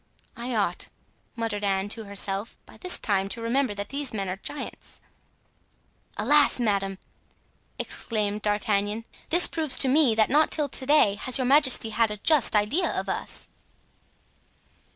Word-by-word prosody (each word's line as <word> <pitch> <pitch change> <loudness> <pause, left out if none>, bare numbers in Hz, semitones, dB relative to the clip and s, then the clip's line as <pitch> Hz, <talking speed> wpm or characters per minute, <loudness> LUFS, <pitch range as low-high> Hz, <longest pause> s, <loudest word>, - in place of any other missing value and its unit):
"I 240 0 -5
ought," 200 -5 -1 0.5
muttered 225 -3 -4
Anne 195 0 0
to 220 +1 -4
herself, 200 +2 -4
"by - - -17
this 365 -1 +2
time 195 -2 -1
to 230 - -7
remember 240 -1 0
that 200 0 -6
these 275 -4 -4
men 195 -2 -3
are 185 - -4
giants." 270 +7 -7 1.2
"Alas, 295 -3 +3
madame!" 195 -4 -1 0.8
exclaimed 210 -2 -3
D'Artagnan, 210 +1 -1 0.2
"this 345 +2 +8
proves 310 -5 0
to 270 - +3
me 265 -4 +3
that 220 +1 +2
not 300 +2 +3
till 295 -2 +1
to 260 - -4
day 250 -9 +4
has 255 - 0
your 260 - -1
majesty 260 -4 +4
had 225 +1 +1
a 210 - -5
just 280 +1 +2
idea 210 - +1
of - - -6
us." - - -5
225 Hz, 150 wpm, -25 LUFS, 205-270 Hz, 1.2 s, this